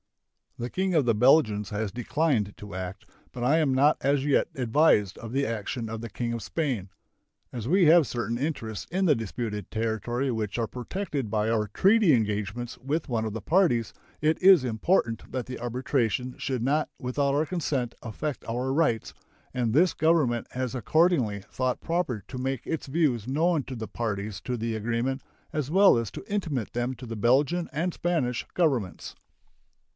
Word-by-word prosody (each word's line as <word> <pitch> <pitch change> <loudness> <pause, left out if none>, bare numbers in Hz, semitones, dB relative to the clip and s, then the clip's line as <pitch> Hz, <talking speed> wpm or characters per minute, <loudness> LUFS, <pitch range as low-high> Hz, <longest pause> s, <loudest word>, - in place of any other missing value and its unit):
The 120 +1 -4
King 190 -1 0
of 150 -5 +3
the 115 - +3
Belgians 110 -4 +4
has 105 -2 -2
declined 120 -2 0
to 105 -1 -10
act, 95 +1 -6 0.3
but 120 - -5
I 145 +6 +4
am 145 -4 +2
not 145 +4 +4
as 140 0 +1
yet 145 - +3
advised 120 - +3
of 115 - -7
the 135 +2 +1
action 115 0 -3
of 110 0 -5
the 115 - -6
King 115 +3 -3
of 115 - -4
Spain. 125 - -2 0.6
As 120 -2 -4
we 180 +4 +4
have 160 -2 +6
certain 120 -1 -2
interests 120 -7 -3
in 190 +2 +1
the 150 -5 +5
disputed 110 -2 -4
territory 115 +4 -1
which 110 -2 -3
are 115 -1 0
protected 135 - -4
by 105 0 0
our 110 -2 +1
treaty 195 - +4
engagements 105 +1 -1
with 145 +4 -2
one 115 -2 0
of 110 - -3
the 115 - -5
parties, 135 - +2 0.3
it 155 +1 +1
is 185 -6 +7
important 115 - 0
that 130 -1 -3
the 125 - -7
arbitration 125 0 -1
should 130 -4 -2
not 150 +4 +1
without 140 +2 0
our 150 +2 +2
consent 145 -9 -2
affect 130 +5 -4
our 125 +3 -1
rights, 140 -7 +1 0.4
and 120 -3 0
this 165 +9 +4
Government 150 -8 +2
has 130 -1 -3
accordingly 130 - +2
thought 130 -1 -1
proper 165 - -2
to 130 - -7
make 130 -1 -2
its 160 - -3
views 135 -7 +1
known 155 +3 +1
to 130 - -7
the 110 -2 -5
parties 105 -3 -4
to 125 -1 -3
the 115 0 -2
agreement, 120 +5 -1 0.3
as 150 -3 -2
well 195 +4 +6
as 115 -3 -1
to - - -8
intimate 160 - -2
them 120 +2 -1
to 125 +1 -10
the 115 -1 -5
Belgian 140 +10 +2
and 170 +4 -1
Spanish 145 -9 -1
Governments. 135 - 0
125 Hz, 180 wpm, -27 LUFS, 115-150 Hz, 0.6 s, is